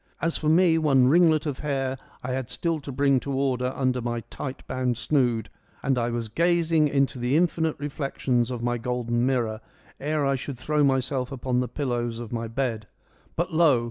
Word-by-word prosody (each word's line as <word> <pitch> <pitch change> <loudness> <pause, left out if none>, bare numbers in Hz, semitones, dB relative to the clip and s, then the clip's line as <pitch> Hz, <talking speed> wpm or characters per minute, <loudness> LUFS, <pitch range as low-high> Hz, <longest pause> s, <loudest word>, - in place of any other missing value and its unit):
As 165 0 0
for 155 - 0
me, 165 0 +5
one 135 -5 +4
ringlet 160 -1 +4
of 145 -4 -3
hair 135 -3 -1 0.3
I 125 - -3
had 130 -1 -3
still 165 -2 -1
to 140 -1 -7
bring 140 0 +3
to 140 - -5
order 130 -2 0
under 130 -2 0
my 120 0 -2
tight 135 -1 -6
bound 125 -2 -1
snood, 120 -5 +1 0.4
and 135 -1 +2
I 120 -1 0
was 120 -1 -3
gazing 165 +3 +2
into 140 -2 0
the 125 +4 +2
infinite 165 -2 +1
reflections 135 -4 -1
of 120 -2 -4
my 120 0 0
golden 120 0 -1
mirror 115 -4 0 0.4
ere 150 0 0
I 135 - +2
should 130 0 -6
throw 150 +4 +1
myself 130 -1 +1
upon 125 -1 -1
the 125 - 0
pillows 120 -3 -2
of 120 -1 -7
my 115 -1 -2
bed. 115 -3 -2 0.5
But 170 +1 -2
lo 155 -6 +5
130 Hz, 190 wpm, -26 LUFS, 120-150 Hz, 0.5 s, me